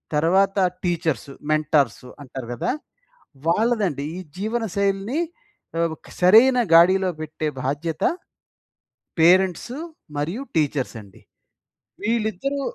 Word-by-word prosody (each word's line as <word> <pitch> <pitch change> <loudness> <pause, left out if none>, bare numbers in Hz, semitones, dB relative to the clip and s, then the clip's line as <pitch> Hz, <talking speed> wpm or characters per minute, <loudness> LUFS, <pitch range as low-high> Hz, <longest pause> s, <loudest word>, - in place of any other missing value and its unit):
తర్వాత 190 +6 +3 0.3
టీచర్సు, 165 -7 -1 0.2
మెంటార్సు 145 -5 +1
అంటారు 130 -2 -8
కదా! 120 - -1 0.8
వాళ్ళదండి. 200 - +1
ఈ - - -5 0.2
జీవనశైలిని 205 - -1 0.6
ఆహ్, 165 0 +2
ఒక - - -19
సరైన 230 +8 +7
గాడిలో 185 +3 +6
పెట్టే 155 0 -4 0.2
బాధ్యత 150 +4 -2 1.2
పేరెంట్సు 185 +7 +3 0.4
మరియు 165 - -2
టీచర్సండి. 130 - -2 0.8
వీళ్ళిద్దరూ 225 +5 -1
175 Hz, 85 wpm, -23 LUFS, 150-210 Hz, 1.2 s, సరైన